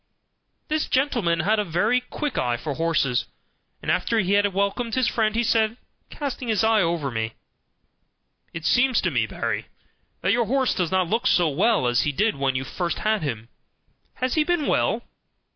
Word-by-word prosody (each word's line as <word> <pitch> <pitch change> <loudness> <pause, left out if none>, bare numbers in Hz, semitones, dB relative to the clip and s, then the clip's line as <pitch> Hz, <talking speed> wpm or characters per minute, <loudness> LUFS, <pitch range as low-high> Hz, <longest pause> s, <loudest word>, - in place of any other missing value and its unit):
This 310 -1 -1
gentleman 235 - +1
had 210 +5 +2
a - - +2
very 210 +8 +1
quick 280 +2 -4
eye 120 -1 0
for 145 +3 -4
horses; 155 -6 0 0.6
and - - 0
after 185 +5 0
he 195 -3 +1
had 205 0 +3
welcomed 200 +4 -1
his 255 -2 +2
friend 220 -2 0
he 235 - +2
said, 225 0 +1 0.3
casting 275 -4 -5
his 220 -1 +1
eye 220 -1 +4
over 165 -5 -1
me: 110 0 -3 1.2
"It 165 -1 -7
seems 250 - +3
to 185 - 0
me, 115 -5 +1
Barry, - - -3 0.5
that 185 - +2
your 235 -1 +2
horse 260 +3 +1
does 180 -3 -1
not 185 -2 +1
look 230 +7 0
so 175 -9 +3
well 185 - +2
as 120 0 +2
he 150 - 0
did 210 +10 +1
when 135 -1 0
you 130 - -1
first 170 +6 -3
had 215 -1 0
him; 115 -6 -4 0.7
has 255 0 -1
he 310 - +3
been 345 -2 0
well?" - - +1
200 Hz, 185 wpm, -24 LUFS, 160-235 Hz, 1.2 s, eye